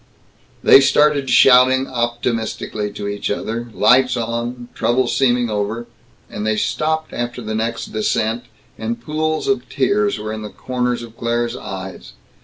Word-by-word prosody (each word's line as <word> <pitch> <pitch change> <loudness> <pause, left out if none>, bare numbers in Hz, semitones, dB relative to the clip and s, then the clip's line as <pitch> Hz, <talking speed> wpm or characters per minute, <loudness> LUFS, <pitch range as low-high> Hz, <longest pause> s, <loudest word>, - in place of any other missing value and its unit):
They 135 - +8
started, 145 -1 +3
shouting 130 0 +6
optimistically 120 -4 -2
to 100 0 -5
each 100 0 -3
other, 115 +3 -3
lights 125 +3 +4
on, 120 +1 -4
trouble 125 +2 +1
seeming 125 -1 +2
over 105 +3 -2 0.4
and 105 - -6
they 110 0 0
stopped 155 +7 -1
after 120 +1 -4
the 110 -2 -5
next 115 +2 -3
descent, 110 +2 -1 0.3
and 115 +1 -3
pools 155 +5 -2
of 205 +3 0
tears 205 - +1
were 110 +1 -5
in 110 - -5
the 105 - -6
corners 125 +1 -2
of 115 -1 -12
Claire's 120 0 -1
eyes. 95 0 -8
120 Hz, 145 wpm, -19 LUFS, 110-130 Hz, 0.4 s, They